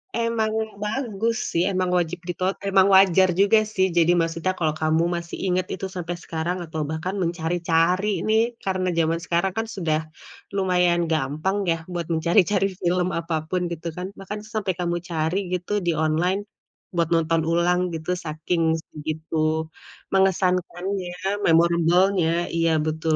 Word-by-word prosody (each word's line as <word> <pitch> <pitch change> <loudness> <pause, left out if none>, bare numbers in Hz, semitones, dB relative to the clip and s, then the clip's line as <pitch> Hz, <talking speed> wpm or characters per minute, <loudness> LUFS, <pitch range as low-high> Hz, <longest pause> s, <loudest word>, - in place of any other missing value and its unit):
emang 230 -2 0 0.3
bagus 225 0 -1 0.2
sih, 170 +2 +1
emang 185 -2 0
wajib 180 0 0
diton 185 +2 -1
emang 195 -1 +4
wajar 190 -1 +6
juga 200 +4 +5
sih. 190 -3 +1
Jadi 170 +1 +4
maksudnya 165 +2 0
kalo 160 -4 0
kamu 160 +1 +2
masih 170 0 -5
inget 185 0 0
itu - - -5
sampai 175 -1 -4
sekarang 165 +2 -2
atau 160 -1 -5
bahkan 160 +5 -3
mencari-cari 170 +2 +1 0.2
nih, 220 +1 +4 0.2
karena 185 -1 -1
zaman 165 0 +1
sekarang 175 +2 0
kan 225 0 -1
sudah 160 -5 0 0.6
lumayan 180 -3 +2
gampang 155 +6 0
ya 165 - +1
buat 170 -2 -3
mencari-cari 185 +4 +3
film 180 0 +1
apapun, 165 +2 -2
gitu 170 0 -5
kan? 180 +1 -3
Bahkan 200 +2 -6 0.2
sampai 200 -3 0
kamu 175 -1 0
cari 160 +2 0 0.2
gitu 180 +1 -3
di 175 - +2
online, 175 +5 +1 0.6
buat 170 -1 +1
nonton 165 -1 +2
ulang 175 +1 +2 0.2
gitu 160 +2 -4
saking 165 0 -2 0.2
segitu 155 +1 -2 0.5
mengesankannya, 185 0 0 0.3
memorable-nya, 170 +1 +3
iya, 165 0 +2
betul 160 0 0
175 Hz, 140 wpm, -24 LUFS, 165-190 Hz, 0.6 s, wajar